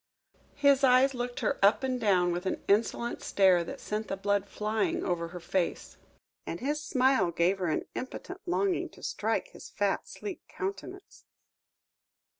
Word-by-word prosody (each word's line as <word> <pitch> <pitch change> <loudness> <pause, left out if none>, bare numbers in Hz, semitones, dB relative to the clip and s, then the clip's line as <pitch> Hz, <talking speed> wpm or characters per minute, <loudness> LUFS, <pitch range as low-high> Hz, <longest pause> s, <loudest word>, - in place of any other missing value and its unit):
His 280 -1 +4
eyes 260 +1 +5
looked 245 -1 -4
her - - -1
up 205 +6 +5
and 255 -2 -1
down 185 -5 +3
with 175 +2 -3
an - - -2
insolent 230 +3 +1
stare 185 -3 +4
that - - -7
sent 215 0 -3
the 195 - -3
blood 200 0 0
flying 215 0 -1
over 170 -2 -1
her 175 +1 -8
face, 175 +1 -2 0.5
and 170 - -4
his 295 +3 -1
smile 260 - +2
gave 175 +3 +1
her 180 - -1
an 155 - -1
impotent 365 +8 -6
longing 370 +1 0
to - - -15
strike - - -1
his - - -12
fat, - - -1
sleek 400 -3 -7
countenance. 390 +1 -7
215 Hz, 160 wpm, -29 LUFS, 185-270 Hz, 0.5 s, eyes